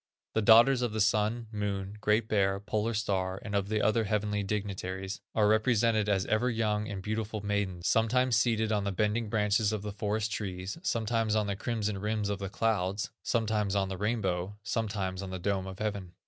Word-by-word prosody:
The 110 - +2
daughters 115 +5 +7
of 120 -3 -1
the 110 - -2
Sun, 110 +2 +2
Moon, 100 -2 -3
Great 105 +1 +2
Bear, 100 -2 +2
Polar 110 +2 -1
star, 95 -3 -1
and 105 - -5
of 100 0 0
the 110 -1 0
other 110 +1 +2
heavenly 105 0 0
dignitaries, 95 -1 -4
are 105 -2 +4
represented 110 -1 +3
as 95 -2 +2
ever 120 +4 +1
young 105 -2 0
and 95 -3 -5
beautiful 110 0 -3
maidens, 100 -4 -1
sometimes 120 +2 +3
seated 110 -1 +2
on 105 -2 +1
the 100 - -1
bending 105 +3 0
branches 105 0 +2
of 105 -2 -3
the 105 - -4
forest 105 +1 -2
trees, 95 - -4
sometimes 115 - 0
on 105 -1 +2
the 100 -1 -2
crimson 105 -2 -2
rims 105 0 -1
of 100 -1 -2
the 100 -1 -4
clouds, 100 -2 -1
sometimes 105 -3 0
on 95 -1 +1
the 95 - -4
rainbow, 100 -3 -1
sometimes 100 -4 -2
on 95 - -5
the 95 - -4
dome 95 +1 -1
of 95 -1 -7
heaven. 100 -4 -3
105 Hz, 190 wpm, -30 LUFS, 100-110 Hz, -, daughters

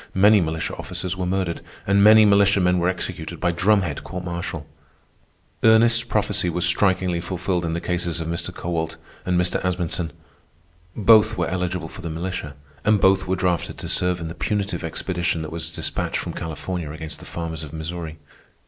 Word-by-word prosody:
Many 105 +2 +6
militia 80 -1 -2
officers 90 0 -4
were 90 -1 -2
murdered, 90 -2 -1 0.2
and 100 +1 +4
many 110 +1 +8
militiamen 100 -3 +4
were 90 +1 +2
executed 95 - -4
by 90 - +1
drumhead 95 +1 +1
court 90 -1 -6
martial. 85 -3 -4 1.0
Ernest's 115 +1 +5
prophecy 105 -4 0
was 90 +1 +1
strikingly 90 -1 +2
fulfilled 90 0 -2
in 80 -1 -1
the - - -1
cases 85 -1 -1
of 80 - -4
Mr. 85 +1 -3
Kowalt 80 -2 -3 0.3
and 90 -1 +2
Mr. 90 0 0
Asmunsen. 90 -2 -1 0.9
Both 110 0 +5
were 85 -2 0
eligible 90 -1 -2
for 95 - -10
the 85 - -5
militia, 80 -3 -4 0.3
and 105 -1 +4
both 95 0 +3
were 95 - +1
drafted 90 -2 -1
to - - -6
serve 90 -1 +1
in 85 - -5
the 80 - -6
punitive 100 -1 -2
expedition 85 0 -2
that 80 - -6
was 80 0 -5
despatched - - -2
from - - -4
California 80 +1 -4
against 80 0 -6
the - - -12
farmers 80 -2 -5
of 75 -2 -8
Missouri. 80 0 -5
90 Hz, 175 wpm, -23 LUFS, 85-95 Hz, 1.0 s, many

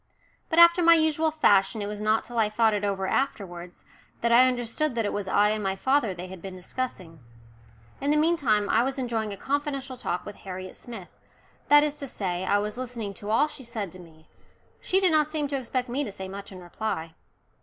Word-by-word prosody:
But 325 - -1
after 340 +1 +8
my 335 0 +7
usual 315 0 +3
fashion 205 -9 +3
it 205 - -2
was 210 0 -6
not 215 +1 +2
till 240 -1 -4
I 215 -1 +3
thought 220 0 +2
it 205 0 -1
over 195 -1 -1
afterwards 180 -10 -3 0.4
that 235 - +1
I 250 +2 +7
understood 250 +3 -1
that 230 -2 0
it - - -2
was 205 -2 -3
I 205 +2 +3
and 215 0 -1
my 195 -1 -1
father 260 +1 +1
they 180 0 -7
had 185 -1 -10
been 190 0 -7
discussing. 185 -4 -6 0.8
In 280 - -1
the 300 - +3
meantime 285 -11 +2
I 225 - +3
was 265 +3 -2
enjoying 230 -4 -2
a 200 - -6
confidential 275 0 -3
talk 180 -7 -3
with 205 - -9
Harriet 185 -1 -8
Smith 225 -7 -10 0.5
that 295 0 +7
is 300 -1 0
to 280 - -5
say, 185 -6 -3
I 200 - +3
was 210 +2 -3
listening 235 -5 -5
to 205 +2 -8
all 235 +8 +3
she 290 -3 -11
said 220 -6 -5
to 185 - -13
me; 160 -2 -16 0.5
she 380 - +1
did 375 -3 +3
not 305 -1 +3
seem 305 -2 -2
to 280 - -2
expect 255 -1 -2
me 260 +4 -1
to 210 - -5
say 190 -1 -7
much 200 +1 -8
in 185 - -10
reply. 175 -3 -4
225 Hz, 220 wpm, -26 LUFS, 195-275 Hz, 0.8 s, after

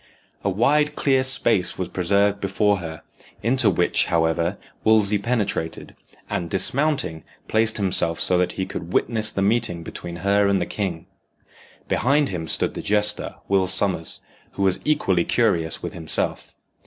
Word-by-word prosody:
A 100 - +1
wide 150 +9 +2
clear 135 -2 +2
space 120 -7 +3
was 95 - -3
preserved 100 +2 +1
before 100 +1 +1
her, 80 -3 -8 0.4
into 120 -1 +3
which, 90 -2 +2
however, 85 +2 0 0.3
Wolsey 105 -2 +3
penetrated, 100 -7 -3 0.3
and, 85 -1 -3
dismounting, 125 - +1 0.2
placed 110 0 +2
himself 90 -4 -1
so 90 - +2
that 90 -1 0
he 95 - -3
could 85 -1 -7
witness 110 -2 +1
the 95 - -1
meeting 100 -5 0
between 85 +1 -8
her 100 0 +3
and 100 -1 +2
the 90 - -1
king. 90 -5 -4 0.8
Behind 140 +4 +2
him 85 -4 -5
stood - - -1
the - - -5
jester, 105 0 0
Will 95 -1 +2
Sommers, 95 -3 +1 0.3
who 100 - -2
was 95 -1 +2
equally 120 - +1
curious 80 -2 +1
with - - -5
himself. 80 -2 -4
100 Hz, 150 wpm, -22 LUFS, 90-110 Hz, 0.8 s, space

